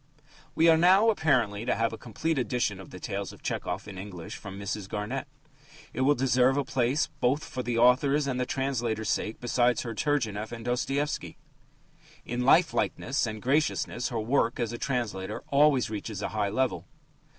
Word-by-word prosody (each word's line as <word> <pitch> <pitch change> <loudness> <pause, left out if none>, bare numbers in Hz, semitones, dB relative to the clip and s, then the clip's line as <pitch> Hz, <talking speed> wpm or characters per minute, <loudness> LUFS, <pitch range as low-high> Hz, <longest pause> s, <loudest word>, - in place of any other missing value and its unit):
We 165 - +4
are 165 -1 +7
now 190 +6 +6
apparently 125 - +1
to 120 - 0
have 115 0 0
a - - -3
complete 140 +6 -2
edition 115 -4 -1
of 95 - -11
the 90 - -10
tales 100 +1 -4
of - - -16
Tchehov 90 +3 -3
in 95 -3 -8
English 95 -4 -8
from 95 0 -8
Mrs. 100 0 -4
Garnett. 115 +7 -3 0.7
It - - -2
will 145 +3 +4
deserve 130 +1 +3
a 145 - +2
place, 130 +4 +1
both 135 +5 +1
for 130 - -5
the 120 -1 -2
author's 135 +5 +4
and 130 -2 -2
the 125 - -1
translator's 120 -5 -1
sake, 110 - -2
beside 120 0 +2
her 115 - -5
Turgenev 110 -6 -1
and 115 -1 -7
Dostoevsky. 135 +4 -2 0.9
In 120 +1 -3
lifelikeness 135 -2 +2
and 110 -1 -6
graciousness 130 -3 0
her 120 -3 -2
work 115 +1 +1
as 120 -1 -1
a 120 - -5
translator 115 -8 -3
always 140 -4 +4
reaches 105 -1 -5
a - - -1
high 105 -1 -1
level. 130 +4 -1
120 Hz, 175 wpm, -28 LUFS, 110-135 Hz, 0.9 s, are